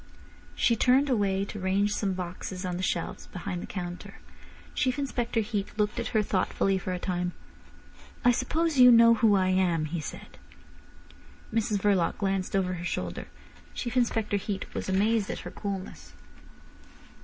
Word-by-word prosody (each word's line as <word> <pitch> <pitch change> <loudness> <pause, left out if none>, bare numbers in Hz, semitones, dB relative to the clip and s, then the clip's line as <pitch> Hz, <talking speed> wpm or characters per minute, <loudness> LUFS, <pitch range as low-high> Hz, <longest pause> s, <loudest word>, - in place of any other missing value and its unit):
She 235 - +3
turned 260 +5 +3
away 200 -4 +1
to 210 - -7
range 195 +2 +1
some 200 -2 -1
boxes 185 +1 -5
on 180 -1 -2
the - - -4
shelves 175 -2 -2
behind 180 -1 -5
the - - -7
counter. 175 -2 -6 0.6
Chief 260 -1 0
Inspector 245 -4 -1
Heat 210 -2 -4
looked 210 -1 0
at - - -2
her 215 -2 +1
thoughtfully 195 -1 0
for 185 - -4
a 180 - -1
time. 180 -1 -2 0.9
"I 245 - +7
suppose 295 +5 0
you 250 0 +10
know 230 0 +8
who 220 -2 +4
I 185 -1 +2
am?" 180 -4 +2
he 165 +3 -3
said. 150 - -9 1.1
Mrs 220 -2 +1
Verloc 195 -4 +2
glanced 195 -2 -1
over 185 -1 +1
her 175 -1 -5
shoulder. - - -3 0.5
Chief 240 -1 -4
Inspector 225 -4 +1
Heat 195 0 -4
was - - -4
amazed 205 +2 +2
at - - -4
her - - -8
coolness. 195 - -6
200 Hz, 160 wpm, -28 LUFS, 185-230 Hz, 1.1 s, you